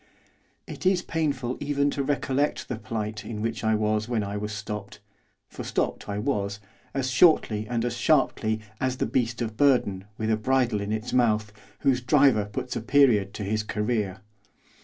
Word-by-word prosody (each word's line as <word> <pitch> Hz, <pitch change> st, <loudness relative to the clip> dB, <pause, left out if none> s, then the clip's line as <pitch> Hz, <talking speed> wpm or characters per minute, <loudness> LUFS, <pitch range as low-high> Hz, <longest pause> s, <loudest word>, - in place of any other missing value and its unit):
It -, -, -8 dB
is 185 Hz, -1 st, +3 dB
painful 140 Hz, -6 st, -1 dB
even 145 Hz, 0 st, +1 dB
to 140 Hz, -, -2 dB
recollect 140 Hz, 0 st, 0 dB
the 125 Hz, -, -3 dB
plight 110 Hz, -2 st, -4 dB
in 110 Hz, -2 st, -6 dB
which 115 Hz, +2 st, -3 dB
I 110 Hz, 0 st, +3 dB
was 110 Hz, +1 st, 0 dB
when 115 Hz, -3 st, 0 dB
I 100 Hz, 0 st, -4 dB
was 105 Hz, +1 st, -3 dB
stopped, 105 Hz, -1 st, -6 dB, 0.5 s
for -, -, -8 dB
stopped -, -, -2 dB
I 100 Hz, -, -2 dB
was, 105 Hz, -4 st, -1 dB, 0.4 s
as 130 Hz, -1 st, 0 dB
shortly 125 Hz, -7 st, +4 dB
and 120 Hz, 0 st, -1 dB
as 120 Hz, -1 st, -2 dB
sharply, 120 Hz, -6 st, +2 dB, 0.2 s
as 130 Hz, 0 st, -1 dB
the -, -, 0 dB
beast 120 Hz, -1 st, 0 dB
of 110 Hz, -1 st, -5 dB
burden, 120 Hz, -9 st, +3 dB
with 110 Hz, 0 st, -1 dB
a 110 Hz, -, +2 dB
bridle 120 Hz, -2 st, +1 dB
in 100 Hz, +1 st, -3 dB
its 110 Hz, +2 st, -3 dB
mouth, 110 Hz, -4 st, +2 dB, 0.3 s
whose 130 Hz, -2 st, +2 dB
driver 130 Hz, -4 st, +4 dB
puts 125 Hz, +5 st, -5 dB
a -, -, -2 dB
period 115 Hz, -6 st, +4 dB
to 105 Hz, -, -4 dB
his 110 Hz, +2 st, 0 dB
career. 105 Hz, -3 st, -2 dB
115 Hz, 180 wpm, -26 LUFS, 105-130 Hz, 0.5 s, shortly